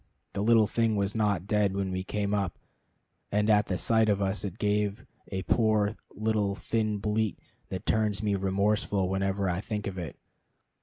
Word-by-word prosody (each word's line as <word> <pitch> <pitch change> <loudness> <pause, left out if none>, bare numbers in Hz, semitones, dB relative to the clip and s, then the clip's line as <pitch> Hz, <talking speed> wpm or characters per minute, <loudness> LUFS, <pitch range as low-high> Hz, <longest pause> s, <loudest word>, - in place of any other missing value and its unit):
The 100 - -2
little 110 0 +5
thing 115 +1 +1
was 100 0 0
not 105 -5 +1
dead 100 -2 +1
when 100 -1 -1
we 95 0 -2
came 100 +1 -2
up, 100 -4 -1 0.7
and 105 +1 +3
at 105 -1 +4
the 90 - -1
sight 110 +1 +3
of 100 -1 +2
us 95 -1 0
it 100 -1 -5
gave 105 -1 0 0.2
a 95 0 -3
poor 110 0 +2
little 105 -1 0
thin 110 -1 -1
bleat 105 0 0 0.3
that 95 +2 -5
turns 105 -2 +1
me 105 -1 +1
remorseful 100 0 +1
whenever 95 +1 0
I 90 +1 0
think 105 -1 -4
of 95 -1 -4
it. 85 -3 -6
105 Hz, 175 wpm, -29 LUFS, 95-105 Hz, 0.7 s, little